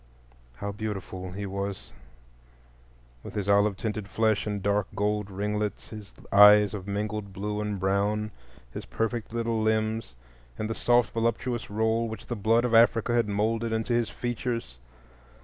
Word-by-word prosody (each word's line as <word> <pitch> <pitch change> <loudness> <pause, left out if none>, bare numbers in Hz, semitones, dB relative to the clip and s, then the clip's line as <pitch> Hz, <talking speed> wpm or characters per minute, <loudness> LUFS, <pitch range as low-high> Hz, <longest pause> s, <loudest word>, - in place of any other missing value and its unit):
How 100 +10 -4
beautiful 95 -3 -5
he 100 +1 -4
was, 100 0 -5 1.3
with - - -10
his 100 -2 -2
olive 100 0 +3
tinted 105 -2 -3
flesh 110 +1 +1
and 105 -1 -2
dark 100 0 +1
gold 105 0 0
ringlets, 105 +1 -3
his 105 -2 -9 0.2
eyes 105 0 +8
of 100 -2 -6
mingled 105 0 -3
blue 105 +2 -3
and 105 -2 -3
brown, 100 +3 0 0.4
his - - -6
perfect 115 - -2
little 115 -1 -1
limbs, 110 - 0 0.4
and 110 - -2
the 115 - -2
soft 120 -2 +2
voluptuous 115 +1 -1
roll 110 +2 0
which 110 -2 -8
the 120 - -4
blood 115 +3 +2
of 120 - -1
Africa 115 +1 +4
had 120 -3 +2
moulded 110 +3 0
into 110 +2 -1
his 120 -1 +1
features! 120 - -4
105 Hz, 150 wpm, -27 LUFS, 100-115 Hz, 1.3 s, eyes